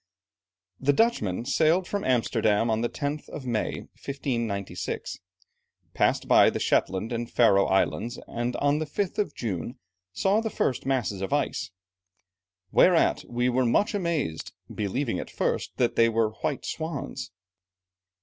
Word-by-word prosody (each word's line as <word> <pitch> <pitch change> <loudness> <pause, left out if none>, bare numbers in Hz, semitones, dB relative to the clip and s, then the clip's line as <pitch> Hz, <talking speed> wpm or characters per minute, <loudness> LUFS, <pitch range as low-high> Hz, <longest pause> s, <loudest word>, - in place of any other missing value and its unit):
The 145 +2 +3
Dutchmen 120 - +1
sailed 160 +6 +2
from 200 -1 -2
Amsterdam 115 -3 +2
on 110 0 +1
the 120 - 0
10th 145 0 -4
of 135 - -7
May, 120 -3 -1
1596, 115 -8 -4 0.7
passed - - +1
by - - +7
the - - -3
Shetland 95 +5 +1
and 120 0 -3
Faröe 100 -5 +4
Islands, 115 +5 0
and 120 +1 -3
on 145 +1 +2
the 155 - -3
5th 195 +6 -2
of 210 - -1
June, 110 - -4 0.3
saw 190 - +2
the 225 - -2
first 130 - -1
masses 120 -8 0
of 95 - -3
ice, - - -1 1.0
"whereat 180 -2 +4
we 120 +1 0
were 125 +1 +2
much 125 - +2
amazed, 170 - -2 0.2
believing 110 +1 -2
at - - -6
first - - -2
that 120 -2 +1
they 115 0 +5
were 115 -1 +2
white 135 +5 -3
swans." 160 -3 -4
125 Hz, 140 wpm, -26 LUFS, 110-150 Hz, 1.0 s, by